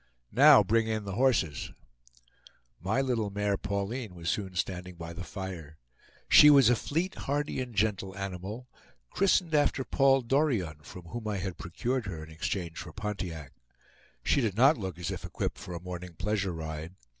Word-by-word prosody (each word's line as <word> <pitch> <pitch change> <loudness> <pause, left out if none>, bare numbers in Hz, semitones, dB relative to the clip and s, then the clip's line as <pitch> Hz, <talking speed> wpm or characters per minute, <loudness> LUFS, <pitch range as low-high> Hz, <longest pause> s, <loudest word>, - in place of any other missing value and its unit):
"Now, 140 -1 +8
bring 110 +3 +2
in 110 -1 -1
the 100 - -5
horses." 110 - +1 1.1
My 100 - 0
little 120 -6 0
mare 105 0 0
Pauline 100 +2 -3
was 85 0 -2
soon 95 -3 -4
standing 90 -1 -3
by 85 0 -7
the 90 - -6
fire. 85 -3 -7 0.5
She 150 - +9
was 135 -5 +7
a - - +4
fleet, 165 +10 -2
hardy, 145 -1 -2
and 125 -3 -6
gentle 100 -2 0
animal, 100 +5 -6 0.4
christened 185 -3 +2
after 145 -2 +2
Paul 135 0 +3
Dorion, 115 - 0
from 90 +3 -10
whom 110 +6 -6
I 105 -2 -1
had 95 -1 -5
procured 120 +7 -2
her 80 -5 -5
in 80 - -12
exchange 85 +1 -3
for 80 - -7
Pontiac. 90 -8 -5 0.7
She 140 - +2
did 110 -5 -1
not 135 +6 +6
look 95 -6 -5
as 85 -2 -3
if - - -6
equipped - - -4
for 90 - -7
a - - -4
morning 90 -1 -7
pleasure 100 +2 -1
ride. 80 +1 -6
100 Hz, 170 wpm, -29 LUFS, 90-120 Hz, 1.1 s, She